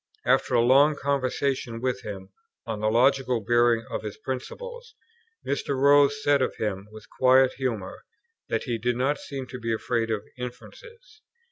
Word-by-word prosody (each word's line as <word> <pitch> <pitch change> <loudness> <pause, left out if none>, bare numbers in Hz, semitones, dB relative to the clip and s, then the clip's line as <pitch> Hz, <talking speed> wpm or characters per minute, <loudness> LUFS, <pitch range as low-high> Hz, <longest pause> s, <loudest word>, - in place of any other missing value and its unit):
After 125 - +2
a 120 - +5
long 140 +5 +5
conversation 135 -3 -1
with 130 +1 -2
him 95 -2 -8 0.4
on 110 -2 -4
the 110 0 +1
logical 130 +1 +2
bearing 120 +1 +2
of - - -3
his 105 -2 -7
principles, 470 - -7 0.5
Mr. 140 -1 -2
Rose 145 +1 +4
said 145 -1 +3
of 130 - -1
him 100 -2 -3
with 110 0 -13
quiet 130 0 +5
humour, 115 -8 -4 0.5
that - - -1
"he 120 -3 -3
did 120 +2 0
not 135 +4 0
seem 135 -2 -6
to 125 0 -9
be 115 -1 -3
afraid 115 0 -1
of 110 -2 -2 0.2
inferences." 345 - -10
130 Hz, 160 wpm, -26 LUFS, 115-140 Hz, 0.5 s, a